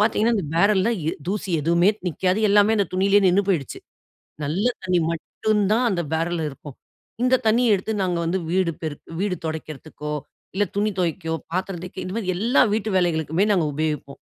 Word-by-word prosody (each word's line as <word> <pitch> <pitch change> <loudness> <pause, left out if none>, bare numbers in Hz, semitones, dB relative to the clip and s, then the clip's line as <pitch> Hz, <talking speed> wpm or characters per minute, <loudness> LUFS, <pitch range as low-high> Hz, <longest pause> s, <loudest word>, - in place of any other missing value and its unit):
பார்த்திங்கன்னா, 220 +2 +2
அந்த 195 - -1
பேரல்ல 200 +3 +3 0.2
எ - - +3 0.2
தூசி 200 0 -2
எதுவுமே 170 +4 +3 0.2
நிக்காது. 185 +3 0
எல்லாமே 205 +2 +5
அந்த 200 - +2
துணியிலயே 200 +2 +4
நின்னு 185 +3 +3
போயிடுச்சு. 155 -9 -1 0.7
நல்ல 170 +9 -1 0.2
தண்ணி 180 -1 +2
மட்டும் 210 +6 -1
தான் 245 +2 +2
அந்த 180 -3 0
பேரல்ல 165 0 -1
இருக்கும். 140 0 -11 0.5
இந்த 255 +1 +4
தண்ணிய 225 0 +4
எடுத்து, 200 +3 -3
நாங்க 180 -2 0
வந்து 180 +3 0
வீடு 185 -2 +2
பெருக் 155 -2 -6
வீடு 195 -2 0
தொடைக்கிறதுக்கோ, 155 -1 -6 0.4
இல்ல 205 +1 +2
துணி 210 +1 +2
தொவைக்கோ, 165 -1 -1 0.2
பாத்திரம் 185 -1 -2
தேய்க்க 185 +1 -7
இந்த 185 - -5
மாரி, 185 -5 -1
எல்லா 235 +7 +3
வீட்டு 220 0 -1
வேலைகளுக்குமே 170 0 +1
நாங்க 175 -5 +2
உபயோகிப்போம். 150 -2 -3
185 Hz, 170 wpm, -23 LUFS, 165-205 Hz, 0.7 s, எல்லாமே